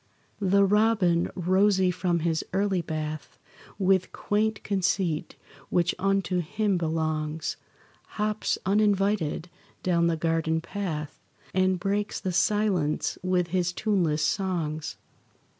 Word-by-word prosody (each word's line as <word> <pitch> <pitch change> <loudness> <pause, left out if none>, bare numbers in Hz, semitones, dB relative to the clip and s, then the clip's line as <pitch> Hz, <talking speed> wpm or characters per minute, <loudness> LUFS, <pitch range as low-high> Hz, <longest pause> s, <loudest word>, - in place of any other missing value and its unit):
The 200 0 +4
robin, 205 -4 +3
rosy 190 +1 +3
from 175 -1 0
his 160 -1 0
early 195 -1 +1
bath, 155 -2 -5 0.4
With 190 -1 +2
quaint 215 +1 -1
conceit, 190 -5 0 0.3
which 175 0 +2
unto 195 -1 +1
him 200 +4 0
belongs, 155 -1 -2 0.6
Hops, 215 0 0
uninvited, 200 -4 +1 0.4
down 170 -2 +2
the 165 -1 +1
garden 160 0 0
path 160 -4 -5 0.3
And 185 -1 +2
breaks 205 +3 -1
the 185 - -3
silence 195 -7 +1
with 180 -1 +1
his 175 0 0
tuneless 175 -7 +1
songs. 160 -4 -2
185 Hz, 110 wpm, -27 LUFS, 165-200 Hz, 0.6 s, The